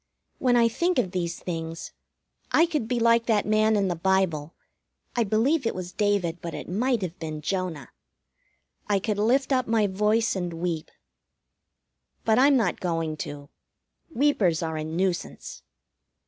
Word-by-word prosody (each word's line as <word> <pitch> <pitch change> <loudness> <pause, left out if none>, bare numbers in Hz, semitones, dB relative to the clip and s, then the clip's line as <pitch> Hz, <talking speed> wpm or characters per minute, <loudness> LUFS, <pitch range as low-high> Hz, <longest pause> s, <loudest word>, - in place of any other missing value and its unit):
4 - - -7
when 245 -1 +5
I 235 -1 +5
think 340 +11 0
of 195 -8 +1
these 170 -2 -2
things, 165 -1 -5 0.6
I 330 - +5
could 305 -9 -2
be 245 0 0
like 230 0 +3
that 215 -3 +2
man 215 +1 +3
in 200 -2 +2
the 175 - -1
Bible 170 -4 0 0.6
(I 240 - +3
believe 230 +9 +2
it - - -2
was 180 -1 -5
David, 195 -5 0
but 170 -1 -5
it - - -7
might 230 +4 0
have 175 -1 -5
been 155 -2 -5
Jonah), 180 -2 -3 1.0
I 205 - +2
could 205 +1 -2
lift 260 +6 +2
up 255 -1 +1
my 225 -2 +2
voice 210 +4 +1
and 175 -2 -3
weep. 165 -2 -3 1.4
But 220 +1 +4
I'm 275 +1 +6
not 220 -7 0
going 165 -3 -2
to. 145 -1 -7 0.6
Weepers 225 - +2
are 160 -1 -3
a 155 - -3
nuisance. 175 +3 -3
195 Hz, 160 wpm, -26 LUFS, 170-230 Hz, 1.4 s, I'm